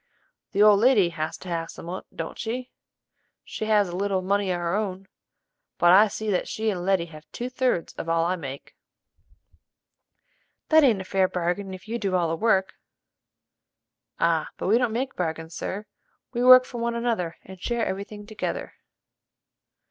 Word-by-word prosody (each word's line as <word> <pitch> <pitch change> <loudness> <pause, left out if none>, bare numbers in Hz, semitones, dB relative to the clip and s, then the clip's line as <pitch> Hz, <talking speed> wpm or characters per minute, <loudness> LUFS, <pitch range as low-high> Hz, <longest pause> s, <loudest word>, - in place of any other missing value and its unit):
"The 205 +1 +4
old 210 -1 +7
lady 220 -6 +5
has 155 -2 -4
to - - -12
have 165 -1 -3
some - - -10
on't, 185 +2 -6
don't 165 - -5
she?" 245 +3 -4 0.7
"She 215 - -5
has 210 -2 +3
a 175 - -6
little 195 0 0
money 200 +1 +1
of 180 -1 0
her 170 0 -1
own; 195 -2 -2 0.7
but 175 - +5
I 205 +4 +7
see 215 +1 -3
that 180 - 0
she 220 0 -1
and 180 -3 -4
Letty 190 -2 +2
have 155 -2 -14
two 245 +1 -5
thirds 255 -9 0
of 165 - -4
all 165 0 +2
I 180 +2 +1
make." 140 -5 -8 1.9
"That 315 -1 +6
ain't 225 -8 +4
a - - -8
fair 190 0 +2
bargain 180 +2 -2
if 185 +1 -10
you 235 +2 -3
do 195 -4 -1
all 175 -2 +1
the 165 - 0
work." 190 -1 +2 1.5
"Ah, 165 -2 +1
but - - -5
we 220 +5 +4
don't 245 -3 +1
make 260 +4 -2
bargains, 160 -1 -3
sir: 205 +5 -5 0.5
we 240 0 0
work 255 0 +9
for 240 - -7
one 235 0 -1
another 225 -8 -1
and 190 -1 -12
share 235 +1 -1
every 195 +1 -3
thing 210 0 -11
together." 215 0 -4
195 Hz, 180 wpm, -25 LUFS, 175-220 Hz, 1.9 s, work